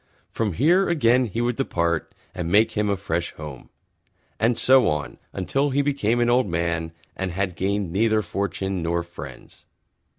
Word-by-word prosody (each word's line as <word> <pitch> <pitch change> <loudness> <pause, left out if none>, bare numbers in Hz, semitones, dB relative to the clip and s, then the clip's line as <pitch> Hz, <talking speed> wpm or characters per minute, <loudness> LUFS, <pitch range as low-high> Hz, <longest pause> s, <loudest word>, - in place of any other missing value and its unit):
From 110 -4 -1
here 175 - +3
again 125 -6 +3
he 115 +1 -3
would 120 0 0
Depart 85 - -1 0.2
and 85 -2 -3
make 110 +3 +5
him 105 -1 0
a 100 - +1
Fresh 85 -3 -3
Home, 75 -5 -9 0.7
and 115 +2 +2
so 130 0 +5
on 75 -1 -2
until 135 +10 0
he 140 +1 +1
Became 130 -5 +1
an 120 - +3
Old 120 -1 +3
Man 85 -1 -1 0.2
and 95 -1 -3
had 95 -1 -2
gained 100 -1 -1
neither 110 +3 +2
Fortune 95 0 -2
nor 85 +1 0
Friends. 85 0 -11
100 Hz, 165 wpm, -24 LUFS, 85-120 Hz, 0.7 s, make